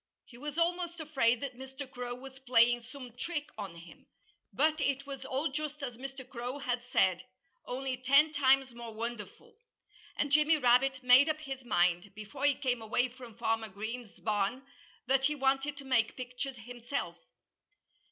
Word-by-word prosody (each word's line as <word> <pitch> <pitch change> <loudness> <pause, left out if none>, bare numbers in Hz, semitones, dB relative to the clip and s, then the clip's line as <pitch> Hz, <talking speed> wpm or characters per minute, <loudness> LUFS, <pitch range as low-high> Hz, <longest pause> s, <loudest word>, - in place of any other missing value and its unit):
He 235 - -16
was 295 +2 -5
almost 345 0 0
afraid 265 -7 +2
that 275 -3 -4
Mr. 265 +1 -7
Crow 245 -2 -5
was 265 +1 -11
playing 240 -2 +4
some 250 0 -11
trick 295 +1 -3
on 200 -5 -6
him. 170 0 -14 0.4
But 310 +2 +2
it 275 -1 0
was 275 -1 -7
all 275 +4 -1
just 300 0 -4
as 245 -3 -4
Mr. 265 +1 -8
Crow 245 +2 -5
had 245 -3 -2
said 185 -7 +2 0.4
only 260 0 -2
ten 275 +5 +5
times 270 -3 +3
more 235 -2 -8
wonderful. 230 - -6 0.6
And 290 - -1
Jimmy 305 +2 +5
Rabbit 260 0 +3
made 250 +4 +7
up 310 0 -1
his 270 -3 -6
mind, 180 -3 +1
before 215 +6 -5
he 285 -1 +5
came 250 -4 -1
away 235 +3 +1
from 245 -3 -12
Farmer 225 -1 0
Green's 220 +3 -6
barn, 210 +4 0 0.4
that 265 +1 +3
he 300 +2 +2
wanted 275 +1 +1
to 280 - -9
make 245 -4 +2
pictures 255 +1 -5
himself. 240 +4 -5
255 Hz, 165 wpm, -32 LUFS, 235-280 Hz, 0.6 s, made